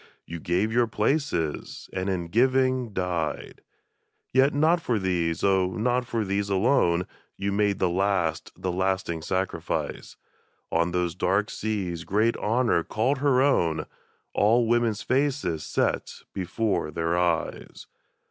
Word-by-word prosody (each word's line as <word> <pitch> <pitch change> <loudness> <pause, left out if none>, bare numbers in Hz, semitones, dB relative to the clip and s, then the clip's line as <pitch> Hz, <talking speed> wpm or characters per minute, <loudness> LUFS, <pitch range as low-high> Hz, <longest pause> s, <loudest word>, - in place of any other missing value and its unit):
You 85 0 -6
gave 90 +7 0
your 120 0 +3
places, 110 - -1
and 95 +1 -2
in 90 -3 -2
giving 130 +2 +2
died! 90 -4 -3 0.7
Yet 135 +2 +5
not 160 +4 +3
for 120 -7 0
these, 85 -4 -1
oh, 95 -2 +2
not 125 +2 0
for 115 -3 -1
these 100 +1 -1
alone. 95 -4 +2 0.3
You 100 0 -1
made 100 0 +1
the 95 - +2
last, 90 -3 0
the 95 - -2
lasting 95 -2 -1
sacrifice! 95 +3 -3 0.5
On 85 +1 +2
those 90 -1 -1
dark 95 +3 0
seas 95 -6 -3
great 110 +6 +1
Honor 115 -5 +1
called 125 - 0
her 135 -2 +3
own, 85 - +2 0.5
All 115 +4 +3
women's 115 -2 +1
faces 130 - 0
set - - -2
before 95 +1 -1
their 85 +2 -1
eyes! 85 -2 -1
100 Hz, 130 wpm, -26 LUFS, 90-120 Hz, 0.7 s, Yet